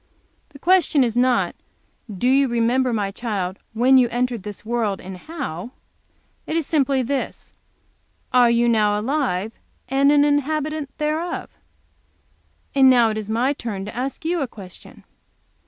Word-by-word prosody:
The - - -14
question 340 -3 +3
is 235 -2 -1
not, 250 0 +2 0.6
do 200 +5 -2
you 270 +1 +4
remember, 240 +2 +1
my 205 -3 -1
child, 195 -4 -4
when 255 +4 +5
you 245 -2 +3
entered 245 -1 -1
this 205 +1 -8
world, 225 -4 -1
and 190 0 -8
how! 250 - -7 0.7
It 320 - -1
is 325 - 0
simply 275 -4 +1
this, 275 +2 -4 0.8
are 245 -1 +6
you 235 0 +3
now 210 -3 +2
alive 225 -5 -1 0.4
and 275 +2 +3
an 290 0 +5
inhabitant 295 0 -1
thereof? 310 +3 -2 1.2
And 270 -1 +6
now 240 -3 +5
it 215 - -4
is 215 -1 -7
my 245 +5 +1
turn 210 -8 -5
to 210 - -8
ask 265 +5 -4
you 340 0 0
a 275 - -1
question. 190 -6 -12
250 Hz, 150 wpm, -22 LUFS, 220-280 Hz, 1.2 s, are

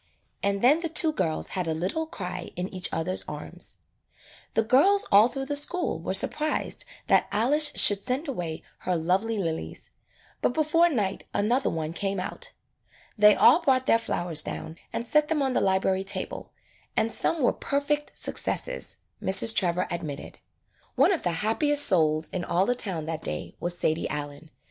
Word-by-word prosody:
And 200 +1 -1
then 285 +6 +5
the 335 -1 -3
two 325 -1 +5
girls 165 - -2
had 185 -3 -2
a 160 - -1
little 195 - -3
cry 180 - -6
in 180 +1 -3
each 185 -1 +2
other's 170 +3 0
arms. - - -6 0.8
The 225 - +3
girls 390 - +3
all 205 +3 +7
through 270 +1 -5
the 290 +1 -3
school 345 +5 +1
were - - -1
sur - - +6
prised 310 +10 -3 0.2
that - - +3
Alice 290 +8 +3
should 205 -1 +4
send 260 +9 -3
away 175 - -5 0.2
her 180 - -2
lovely 190 +7 0
lilies, 165 -5 -5 0.5
but 245 - 0
before 330 +2 +3
night 205 - -2
another 240 +6 +1
one 160 0 -4
came 195 +1 0
out. 185 - -6 0.6
They 210 -1 +6
all 340 - +5
brought 260 -4 +1
their 230 - +3
flowers 175 -8 +1
down 160 +1 -7
and 235 - -4
set 300 +4 +2
them 300 -3 0
on 265 -1 -1
the - - +1
library 190 0 +1
table, 195 - -4 0.5
and 225 - +1
some 330 - -1
were - - +3
per 280 - -2
fect 295 +1 -3
successes, - - -2 0.2
Mrs. 195 +4 +4
Trevor 180 -1 +1
admitted. 160 -5 -6 0.6
One - - +4
of 360 - -1
the 175 - -1
happiest 290 +6 +3
souls 155 -3 +3
in 185 - -4
all 180 +2 +1
the 245 - +1
town 185 -10 -1
that 160 -1 -5
day 75 - -6
was 175 0 -2
Sadie 160 -1 -1
Allen. 145 +1 -6
205 Hz, 175 wpm, -26 LUFS, 175-285 Hz, 0.8 s, all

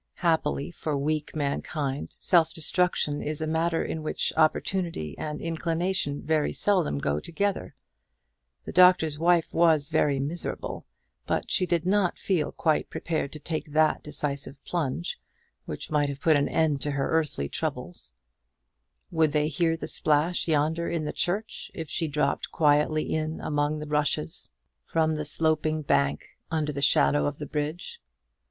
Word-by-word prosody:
Happily 160 -2 +1
for 155 -3 -3
weak 150 +2 -2
mankind, 140 -1 -2
self 165 -3 +3
destruction 160 -3 +1
is 150 0 -3
a 160 - -1
matter 165 +1 0
in 160 - -4
which 155 - -1
opportunity 160 - 0
and 150 -1 -5
inclination 165 -2 -1
very 155 -1 +1
seldom 185 - +1
go 75 +1 0
together. 200 - -2 0.9
The - - -5
Doctor's 180 -4 +5
Wife 170 0 +3
was 160 -4 +4
very 140 -2 +2
miserable; 150 +6 -4 0.4
but - - -1
she 185 -4 +3
did 170 -1 0
not 190 -1 +2
feel 180 -6 0
quite 155 -2 0
prepared 160 -4 -2
to 155 - -7
take 155 -1 -4
that 155 0 +3
decisive 140 -2 -4
plunge 135 - -2 0.5
which 75 - -6
might 145 -1 +2
have 140 -1 -5
put 160 +1 +4
an 145 0 +2
end 150 -4 +1
to 145 - -1
her 140 -1 -1
earthly 155 - 0
troubles, - - -4 1.0
Would 160 -3 +2
they 150 0 +2
hear 165 +2 +1
the - - -5
splash 155 +4 +1
yonder 160 +2 +1
in 165 -2 -2
the - - -3
church, 205 +5 -2
if 160 -3 -6
she 165 - 0
dropped 150 0 -1
quietly 150 0 +3
in 155 0 -2
among 150 0 0
the 150 0 -6
rushes 150 - 0 0.3
from 160 - +1
the 150 -1 -2
sloping 155 0 +1
bank 70 - +1 0.2
under 155 -2 -1
the 140 -1 -4
shadow 75 - +4
of - - -3
the 150 - -5
bridge? 150 +4 -4
155 Hz, 155 wpm, -27 LUFS, 145-165 Hz, 1.0 s, Doctor's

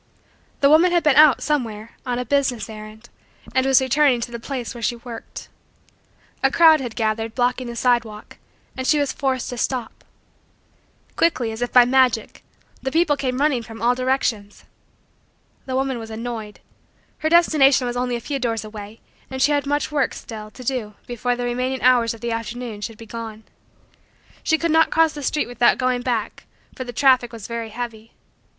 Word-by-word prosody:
The 280 - +5
woman 335 +4 +6
had 345 -1 +2
been 300 -3 +4
out, 300 -1 +6
somewhere, 230 -7 -2 0.2
on 245 -1 -1
a 250 - -3
business 255 -4 0
errand 215 +2 -11 0.5
and 260 0 +2
was 270 0 +6
returning 265 -1 +3
to 240 - -4
the 235 - -6
place 250 0 -5
where 240 - -9
she 235 +2 0
worked. 235 -1 -9 0.9
A - - +4
crowd 320 -3 +6
had 240 -4 -6
gathered, 225 0 -1
blocking 250 0 0
the 235 - -6
sidewalk, 235 -4 -1 0.4
and 260 0 -4
she 305 - +4
was 285 -2 0
forced 265 -3 -2
to 245 - -5
stop. 250 -2 -3 1.1
Quickly, 260 -9 +1
as 220 +2 -7
if 245 - -1
by 245 -1 +7
magic, 250 -3 +1 0.4
the 265 - -3
people 325 -1 +3
came 255 -2 -2
running 285 -4 +2
from 225 0 -11
all 240 +2 +3
directions. 250 -5 -2 1.0
The 260 - -2
woman 265 -2 -1
was 225 -1 -8
annoyed. 225 -2 -6 0.6
Her 315 - 0
destination 300 -6 +4
was 245 0 -3
only 245 0 -1
a - - -3
few 275 +3 -3
doors 230 -3 -1
away 215 0 -10 0.3
and 265 0 -5
she 285 +3 +3
had 285 -1 0
much 290 +1 -1
work, 285 -3 0
still, 215 -2 -8
to 255 +4 -12
do 230 -5 -3
before 245 +1 -2
the 245 0 -3
remaining 255 +2 -2
hours 240 -2 +4
of 225 - -16
the 235 -1 -2
afternoon 230 -1 -5
should 225 +1 -6
be 230 - -11
gone. 225 -1 -8 1.0
She 320 - +2
could 335 0 -1
not 320 +1 +4
cross 325 -1 +3
the 295 - -7
street 295 +2 0
without 240 0 +3
going 255 -1 0
back 240 -4 -3 0.3
for 255 - -5
the 245 - -6
traffic 255 0 +3
was 225 -4 -9
very 230 -1 -5
heavy. 230 -1 -7
245 Hz, 185 wpm, -22 LUFS, 230-270 Hz, 1.1 s, by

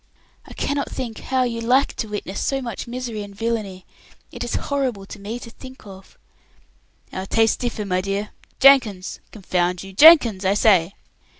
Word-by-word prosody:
"I - - -11
cannot 285 0 -2
think 235 -4 -6
how 260 -1 0
you 230 -2 -3
like 255 +4 +2
to 220 - -3
witness 205 -2 -5
so 270 - -1
much 235 -5 -6
misery 240 -3 -5
and 200 -1 -10
villainy. 210 -4 -3 0.5
It - - -6
is - - -3
horrible 260 -8 -2
to 200 +1 -10
think 255 +2 -12
of." 190 -1 -14 1.0
"Our 190 +1 -5
tastes 225 +1 +2
differ, 230 -4 -4
my 185 -2 0
dear. 200 +2 -3 0.3
Jenkins! 245 -9 +4
Confound 180 -3 -2
you! 195 0 -11
Jenkins, 240 - +7
I 195 +1 +2
say." 195 -4 +3
215 Hz, 160 wpm, -21 LUFS, 195-250 Hz, 1.0 s, Jenkins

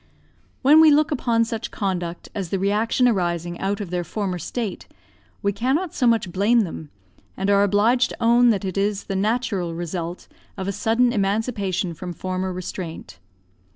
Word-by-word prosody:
When 300 +4 +7
we 320 - +8
look 300 +1 +3
upon 235 -5 +1
such 225 -1 -4
conduct 175 -4 -3
as 195 -5 -4
the 195 - 0
reaction 210 +6 +2
arising 175 -5 -1
out 200 +2 -1
of 195 -4 -6
their 180 -1 -1
former 185 -1 -3
state, 220 +4 -4 0.6
we 200 0 +1
cannot 270 - -1
so 250 - +1
much 225 -6 +2
blame 210 +6 +3
them, 160 -5 -5 0.5
and 195 +1 0
are 200 0 +5
obliged 215 +5 +3
to - - -8
own 240 +1 +5
that 205 -3 +1
it 190 +1 -2
is 200 0 0
the 195 - -4
natural 200 -4 -1
result 170 0 -5 0.3
of 190 -1 -4
a - - 0
sudden 235 +4 +2
emancipation 200 -3 -1
from 175 +2 -7
former 185 +2 -3
restraint. 180 - -7
200 Hz, 170 wpm, -23 LUFS, 185-230 Hz, 0.6 s, we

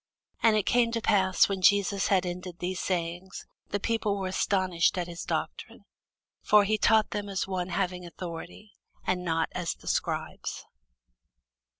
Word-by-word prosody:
And 225 -2 +5
it 210 - 0
came 240 -1 +3
to 230 - 0
pass, 190 -4 +3
when 195 -1 -3
Jesus 200 0 +3
had 190 -2 +2
ended 180 0 -5
these 185 +1 -3
sayings, 180 +1 -3 0.2
the 205 - -1
people 215 -1 0
were 190 -1 -2
astonished 185 -3 +1
at 180 - 0
his 170 0 -7
doctrine: - - -4 0.6
for 210 -1 +5
he 215 +1 +1
taught 220 0 +4
them 205 -1 -3
as 195 -1 -2
one 185 -1 -2
having 180 0 -1
authority, 175 +4 -8 0.3
and 180 -1 0
not 165 -2 0
as 175 -2 -3
the - - -20
scribes. - - -2
185 Hz, 160 wpm, -28 LUFS, 180-205 Hz, 0.6 s, And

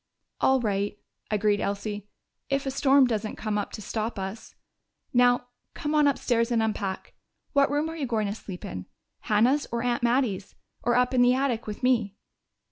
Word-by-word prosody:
"All 265 0 +4
right," 205 -2 -1 0.3
agreed 210 -1 +2
Elsie, 205 0 -3 0.4
"if 275 0 0
a 270 - -1
storm 275 0 +5
doesn't 220 -3 -2
come 215 -1 -2
up 205 - -4
to 215 - -6
stop 220 +2 -3
us.... 195 +3 -6 0.6
Now, 245 0 +4 0.3
come 295 0 -2
on 300 -1 +5
upstairs 240 -4 +1
and 230 -2 +2
unpack. 200 -3 -3 0.4
What 280 -1 +4
room 295 +2 0
are 325 - -5
you 290 -5 -3
going 220 -3 0
to 200 - -2
sleep 195 -4 -8
in 90 -1 -6 0.3
Hannah's 245 +7 +2
or 235 0 -1
Aunt 245 -1 0
Mattie's 235 -5 0 0.3
or 240 - +1
up 250 +1 +3
in 250 - +4
the 245 +1 +5
attic 255 -4 -1
with 210 +3 -6
me?" 230 -6 +2
235 Hz, 180 wpm, -27 LUFS, 210-260 Hz, 0.6 s, storm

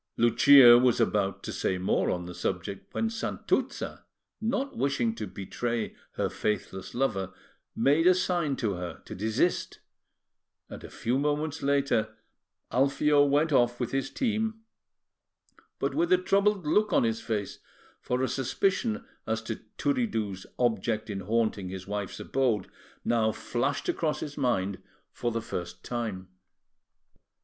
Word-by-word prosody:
Lucia 120 +1 +8
was 125 -1 +3
about 100 -2 +1
to - - -5
say 95 - -1
more 90 - +1
on 90 -1 -2
the 90 - -7
subject, 95 +2 -4
when 225 - 0
Santuzza, 225 0 -2 0.4
not 260 +5 -1
wishing 130 -5 0
to 110 -2 -5
betray 115 +5 -3 0.2
her - - 0
faithless 100 -2 -3
lover, 95 -7 0 0.4
made 150 +5 +3
a 185 - +7
sign 175 -6 0
to 110 -6 -1
her 90 -1 -6
to - - -8
desist; 110 - 0 0.9
and - - -8
a - - -8
few 125 +4 -1
moments 150 +2 -1
later 140 -5 +1 0.5
Alfio 145 +3 +3
went 145 +3 +2
off 120 -3 +3
with 125 - -2
his 135 0 -1
team, 220 - -1 1.2
but 140 0 -1
with 170 +4 +1
a 185 - +7
troubled 195 0 +2
look 210 +8 +2
on - - +4
his 115 -1 0
face, 105 -4 -3 0.4
for 125 +1 -1
a - - +2
suspicion 200 - 0 0.2
as - - 0
to - - -4 0.2
Turiddu's 110 - -1
object 110 -2 0
in 100 - -3
haunting 105 -1 0
his 95 0 -7
wife's 100 -1 -4
abode 120 -8 0 0.4
now 115 -2 +2
flashed 130 +6 -2
across 155 -2 0
his 145 -2 -5
mind 100 -8 0 0.3
for 120 - -2
the 115 -1 -3
first 90 -6 -6
time. 110 -7 -4
120 Hz, 140 wpm, -28 LUFS, 105-150 Hz, 1.2 s, Lucia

